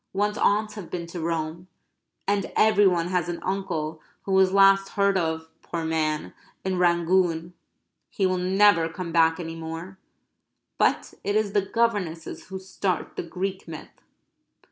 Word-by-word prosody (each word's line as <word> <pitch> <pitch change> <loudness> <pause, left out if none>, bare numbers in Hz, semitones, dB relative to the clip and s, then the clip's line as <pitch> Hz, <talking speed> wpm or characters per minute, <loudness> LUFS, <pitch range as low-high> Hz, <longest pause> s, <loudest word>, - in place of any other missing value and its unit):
One's 205 +2 0
aunts 210 +1 +2
have 200 -6 -8
been 175 -1 -4
to 170 +1 -7
Rome; 165 +1 -3 0.6
and 200 -1 0
every 210 -2 +5
one 175 -2 +1
has 180 -2 0
an 175 - -3
uncle 165 -5 -3 0.2
who 195 - -4
was 190 -1 +4
last 195 0 +5
heard 200 -1 +2
of 160 -3 -1
poor 165 -2 -4
man 155 -1 -1 0.3
in 185 -1 0
Rangoon. 170 -1 +2 0.6
He 195 - 0
will 185 -1 +1
never 185 -2 +4
come 170 +1 -6
back 165 0 +3
any 165 -1 -5
more. 165 +4 -7 0.8
But - - +1
it 205 - -1
is 215 -2 +1
the 205 - +3
governesses 195 -6 -1
who 190 - -6
start 190 0 -3
the - - -2
Greek 190 +3 -4
myth. 160 -2 -10
180 Hz, 155 wpm, -25 LUFS, 165-195 Hz, 0.8 s, every